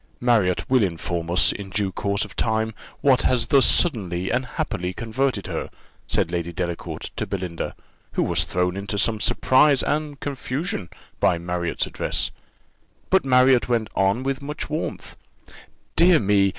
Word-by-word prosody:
"Marriott 110 -7 +2
will 130 -2 +4
inform 85 -2 -2
us, 90 +1 +4
in 100 -1 -7
due 100 -1 -1
course 100 +2 -1
of - - -13
time, 110 0 0 0.3
what 135 -3 +4
has 125 -2 +2
thus 135 +2 +5
suddenly 95 - +1
and 125 +1 0
happily 90 -5 -3
converted 115 +1 -1
her," - - -4 0.4
said - - 0
Lady 85 -1 -2
Delacour 85 0 -4 0.2
to - - -3
Belinda, 90 -3 -4 0.4
who - - +1
was - - +2
thrown 90 0 -1
into 100 +1 -4
some 110 +1 +1
surprise 130 +5 +4
and 150 -1 -2
confusion 135 - -3 0.3
by 85 - +3
Marriott's 85 0 -2
address; - - -1 0.8
but 190 - +4
Marriott 130 -1 +4
went 115 -3 0
on 100 +6 +2
with 135 0 -2
much 150 +1 -5
warmth 155 - -4 0.8
Dear 175 -1 +6
me! 100 -2 +3
110 Hz, 150 wpm, -23 LUFS, 90-130 Hz, 0.8 s, Dear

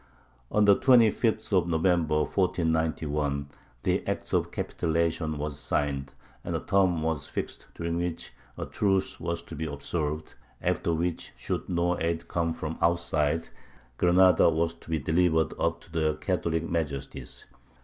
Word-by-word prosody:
On 105 0 +4
the 100 -1 +7
25th 115 -3 +3
of 90 -2 +3
November, 80 -2 +2
1491, 80 -5 0 0.3
the - - +1
act - - -3
of - - +2
capitulation 80 -1 -1
was 75 -1 -4
signed, 70 -1 -1 0.3
and - - -3
a - - 0
term 95 -5 +2
was 80 -3 -1
fixed - - -5
during 85 0 -2
which 85 -1 -3 0.2
a - - -3
truce 95 -2 0
was 85 -1 -3
to 80 - -9
be 80 +1 -3
observed, 75 +1 -3 0.3
after - - 0
which, 85 +1 -2
should - - -4
no 90 0 +1
aid 85 0 -1
come 85 -1 0
from 80 -1 -5
outside, 80 -2 +1 0.5
Granada 90 0 +6
was 85 +1 0
to 85 - -17
be 80 - +1
delivered 80 +2 +2
up 85 0 0
to - - -17
their 80 -2 +1
Catholic 85 -1 -1
Majesties. 75 -5 -4
80 Hz, 145 wpm, -28 LUFS, 80-85 Hz, 0.5 s, the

